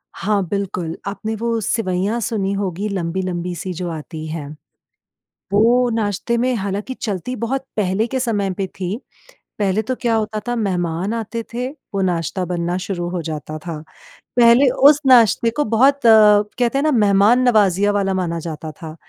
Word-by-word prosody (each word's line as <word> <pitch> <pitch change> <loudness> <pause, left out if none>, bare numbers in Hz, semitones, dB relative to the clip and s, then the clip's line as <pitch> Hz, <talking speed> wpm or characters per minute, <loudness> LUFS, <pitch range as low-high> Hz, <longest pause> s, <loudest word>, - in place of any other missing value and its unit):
हाँ 205 -1 0
बिल्कुल, 180 -4 -3
आपने 215 +2 -4
वो 230 +1 -1
सिवैयाँ 200 +1 -1
सुनी 205 -4 -1
होगी 195 0 -2
लंबी-लंबी 180 -1 -3
सी 185 +2 -5
जो 175 +1 -4
आती 160 0 -7
हैं। 155 -2 -5 1.1
वो 240 +4 +4
नाश्ते 220 +2 -1
में 255 +2 +1
हालाँकि 200 +4 -3
चलती 220 +1 -4
बहुत 260 +4 -3
पहले 205 +2 +1
के 260 +1 -2
समय 210 -6 -1
पे 195 - -2
थीं, 185 +3 -2 0.6
पहले 205 +1 +1
तो 255 +4 -2
क्या 235 -2 +1
होता 215 -1 -1
था 240 - 0
मेहमान 185 -2 -1
आते 230 0 -4
थे, 250 +1 -2 0.3
वो 195 - 0
नाश्ता 180 0 -1
बनना 175 0 -2
शुरू 180 -2 -4
हो 180 -1 -3
जाता 155 -1 -5
था। 165 0 -6 0.6
पहले 240 +3 +6 0.2
उस 295 -1 +3
नाश्ते 235 -2 +5
को - - +4
बहुत 265 +5 +3
कहते 215 +3 +5
हैं 275 - +1
ना 310 - +2
मेहमान 210 0 +4
नवाजिया 205 -3 +3
वाला 200 -1 0
माना 175 -3 -2
जाता 160 -1 -6
था, 155 0 -10
200 Hz, 165 wpm, -19 LUFS, 180-230 Hz, 1.1 s, पहले